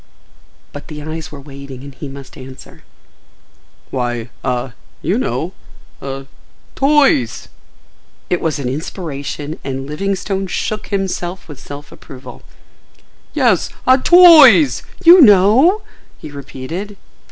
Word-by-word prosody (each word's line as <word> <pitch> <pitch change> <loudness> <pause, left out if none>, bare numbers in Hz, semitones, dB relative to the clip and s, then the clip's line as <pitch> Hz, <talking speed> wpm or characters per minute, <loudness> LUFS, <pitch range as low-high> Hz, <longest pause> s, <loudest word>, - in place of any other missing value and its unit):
But 145 - -10
the 150 -1 -8
eyes 160 +2 -7
were 145 - -10
waiting 140 -2 -11
and 140 -1 -10
he 140 +3 -8
must 135 -1 -11
answer. 130 0 -13 1.1
"Why—ah—you 120 0 -4
know,—ah—toys!" 135 - -2 0.8
It 180 - 0
was 160 -2 -1
an 140 -3 -4
inspiration 145 0 -5
and 135 0 -5
Livingstone 195 +5 -3
shook 215 +3 -4
himself 190 -2 -4
with 145 -4 -11
self 145 +1 -10
approval. 130 0 -12 0.9
"Yes—ah—TOYS! 260 - +5 0.2
you 350 +2 +9
know?" 245 - +5 0.3
he 155 - -10
repeated. 145 +9 -7
150 Hz, 95 wpm, -17 LUFS, 135-200 Hz, 1.1 s, you